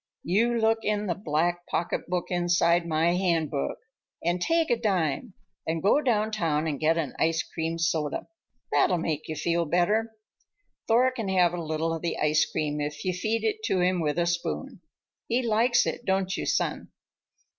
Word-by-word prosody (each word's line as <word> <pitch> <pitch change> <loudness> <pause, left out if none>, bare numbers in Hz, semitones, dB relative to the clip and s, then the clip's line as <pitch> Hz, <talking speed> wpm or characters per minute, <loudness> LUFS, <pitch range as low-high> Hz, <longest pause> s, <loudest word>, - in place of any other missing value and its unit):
You 230 +7 +2
look 225 0 +3
in 210 -1 -1
the 180 - 0
black 175 0 -1
pocketbook 175 +1 -2
inside 175 -1 +2
my 160 +1 +2
handbag 165 - 0 0.5
and 175 +1 0
take 330 - +2
a - - +5
dime 190 - -1 0.3
and 160 +1 -1
go 215 +9 +4
downtown 210 - 0
and 150 -4 -2
get 160 +1 +2
an 155 -4 -2
ice 160 0 +2
cream 165 0 -4
soda. 160 -3 -1 0.4
That'll 180 - +3
make 155 -2 -3
you 155 - -4
feel 170 +2 0
better. 205 +8 +1 0.8
Thor 245 +3 +4
can 225 -6 -4
have 180 -2 +3
a 175 - -3
little 160 +1 -1
of 165 - -4
the 170 -1 -2
ice 150 0 +2
cream 150 -1 -2
if 145 +2 -4
you 185 - +1
feed 215 +5 -1
it 435 0 -1
to 190 - +1
him 180 0 +2
with 150 -1 -1
a 170 - +2
spoon. 175 +7 -3 0.5
He 245 +2 +1
likes 235 +2 +3
it, - - -3
don't 190 -1 0
you, - - -3
son?" - - -1
175 Hz, 175 wpm, -27 LUFS, 160-215 Hz, 0.8 s, a